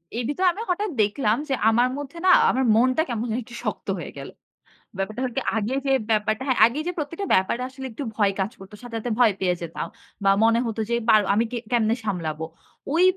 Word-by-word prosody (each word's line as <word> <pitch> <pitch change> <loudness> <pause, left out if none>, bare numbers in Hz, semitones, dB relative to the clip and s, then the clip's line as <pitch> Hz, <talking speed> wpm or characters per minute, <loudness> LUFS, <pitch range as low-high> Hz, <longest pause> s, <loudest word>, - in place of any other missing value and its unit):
এর 240 - -1
ভিতরে 365 +6 +1
আমি 425 - -6
হঠাৎ 410 +3 0
দেখলাম 210 +2 +1
যে, - - +1 0.2
আমার 240 +3 +3
মধ্যে 290 +3 -7
না 370 - +7 0.2
আমার 265 - +1
মনটা 255 +6 +3
কেমন 235 -1 -2
জানি 225 +3 -1
একটু 240 - -11
শক্ত - - -4
হয়ে - - -7
গেল। - - -7 0.7
ব্যাপারটা 215 +6 -3
হলো 250 -2 -2
কি - - +2 0.2
আগে 220 +4 -1
যে, 270 - +1 0.2
ব্যাপারটা 215 +2 +1
হ্যাঁ, 260 - +1
আগেই 260 +7 -1
যে, - - 0
প্রত্যেকটা 330 +6 -4
ব্যাপারে 190 +6 +1
আসলে 265 0 -9
একটু 230 +6 -6
ভয় 205 -2 +3
কাজ 195 +3 0
করত। 195 0 -12
সাথে, 240 -2 -8
সাথে 240 +2 -4
ভয় 230 -4 +5
পেয়ে 180 -1 +1
যেতাম 170 -1 -5 0.4
বা 195 - +5
মনে 230 +1 +4
হত 225 -1 -4
যে, 235 - +2
পার 215 -1 +7
আমি 225 +3 +2
কে 245 - -3
কেমনে 230 -1 +2
সামলাবো। 160 -6 -3 0.5
ওই 335 +3 +4
235 Hz, 220 wpm, -24 LUFS, 210-265 Hz, 0.7 s, না